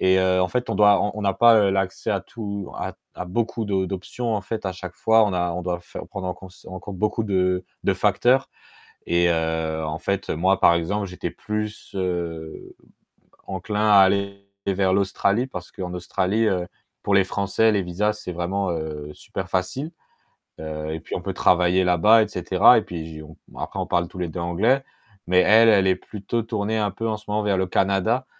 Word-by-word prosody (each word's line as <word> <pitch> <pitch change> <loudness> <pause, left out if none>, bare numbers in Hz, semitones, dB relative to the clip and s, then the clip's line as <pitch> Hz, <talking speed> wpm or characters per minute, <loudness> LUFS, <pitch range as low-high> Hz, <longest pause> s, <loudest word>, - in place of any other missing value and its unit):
et 95 0 +4
heu, 95 0 +2
en 90 - +1
fait 125 +3 -2
on - - -1
doit 105 -1 +5
on 105 - 0
on 105 - -5
n'a 100 -2 +1
pas, 120 -1 +6
heu, 100 -2 +4
l'accès 95 -1 -1
à - - 0
tout 100 -4 -6
à - - -4
t - - -29 0.2
à 90 - -5
beaucoup 115 +4 -2
de 95 -2 0
d'options 110 +5 -3
en 105 - -1
fait 100 +1 -5
à 95 - -2
chaque 90 0 -8
fois, 110 -1 +4
on 100 - -1
a 90 -1 0
on 90 +1 -4
doit 90 -1 -2
faire 85 - -9
prendre 95 -2 -6
en 90 - -2
cons 95 - -12 0.2
en 95 0 -8
compte 100 -2 -8
beaucoup 105 +2 0
de 90 -2 0 0.2
de - - +2
facteurs 130 +2 +2 0.6
et 85 0 +3
heu, 80 -1 -1
en 75 +1 -4
fait, 100 +3 -2
moi 95 +4 +1
par 85 - +6
exemple, 100 +5 -1
j'étais 90 0 -5
plus, 105 0 -5
heu, 85 -4 -4 0.7
enclin 105 +3 -2
à 100 -1 +7
aller 100 +1 +2 0.2
vers 95 -1 +2
l'Australie 100 +4 +1
parce 90 -8 -8
qu'en 90 -2 -6
Australie, 95 +5 0
heu, 90 -3 0 0.4
pour 100 - 0
les 100 - +5
français, 100 +3 +1
les 100 - +1
visas, 95 +4 -1
c'est 90 - -5
vraiment, 95 +3 -2
heu, 75 -2 -5
super 95 +4 -7
facile. 130 - -2 0.7
Heu 75 0 -5
et 80 - -4
puis - - -7
on - - -3
peut - - -4
travailler 90 +1 +3
là-bas, 90 +6 +5
et - - -4
cetera, 95 +4 +4
et - - -3
puis 85 -2 -6
j 80 -1 -9
on 80 +1 -13 0.2
après - - -5
on - - -1
parle 85 -1 +1
tous 90 - -13
les 90 - -1
2 85 - -6
anglais, 110 +11 +1 0.4
mais 90 0 +4
elle, 115 +4 +6
elle 100 -3 +5
est 95 - +3
plutôt 105 +4 -4
tournée 110 -1 -2
un 105 -1 0
peu 115 +4 -4
en 110 - -1
ce 105 - -18
moment 105 +1 0
vers 100 -2 +1
le 95 - +1
Canada, 100 +7 +1
95 Hz, 215 wpm, -23 LUFS, 90-105 Hz, 0.7 s, à